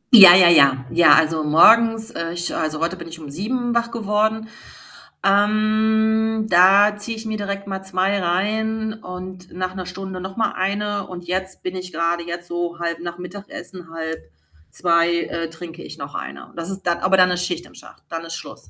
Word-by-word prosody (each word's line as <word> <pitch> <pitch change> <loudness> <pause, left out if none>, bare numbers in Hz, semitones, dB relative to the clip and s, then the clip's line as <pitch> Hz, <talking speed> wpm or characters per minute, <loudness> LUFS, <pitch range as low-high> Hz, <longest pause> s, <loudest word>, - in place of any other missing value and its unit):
Ja, 195 -7 +11
ja, 180 -1 +7
ja. 140 -5 +5
Ja, 165 -3 +6
also, 160 0 +2
morgens, 225 +8 +5
äh, 165 0 -5
ich 175 0 -3
also, 155 -1 -2
heute 170 +3 -1
bin 170 - -10
ich 165 0 -10
um 150 -3 -9
7 240 - -2
wach 235 0 0
geworden. 220 0 -1 0.8
Ähm, 220 +2 +2
da 195 +4 +5
ziehe 225 +2 -5
ich 220 +1 -9
mir 220 -1 -3
direkt 200 -1 -4
mal 190 -1 -5
2 190 +1 -1
rein 215 +5 -1
und 185 -3 -10
nach 185 +1 -4
'ner 185 -1 -6
Stunde 190 0 -7
noch 190 +1 -7
mal 225 - 0
1. 205 +1 -2
Und 180 -1 -9
jetzt 185 +1 -4
bin 185 0 -4
ich 180 -1 -8
grade 170 +1 -1
jetzt 175 0 -6
so 175 0 -3
halb 170 -1 -3
nach 175 0 -7
Mittagessen, 180 -1 -10
13:30 160 - -2
äh, 165 -1 -4
trinke 165 0 -10
ich - - -10
noch - - -8
1. 70 +2 -8
Das 170 +1 -5
ist 195 0 -6
dann 175 -1 +1
aber 190 +1 +2
dann 180 -1 +5
ist 180 0 -1
Schicht 175 -1 -4
im - - -18
Schacht, - - -16
dann 165 0 -5
ist 165 - -7
Schluss. - - -11
185 Hz, 195 wpm, -21 LUFS, 170-210 Hz, 0.8 s, Ja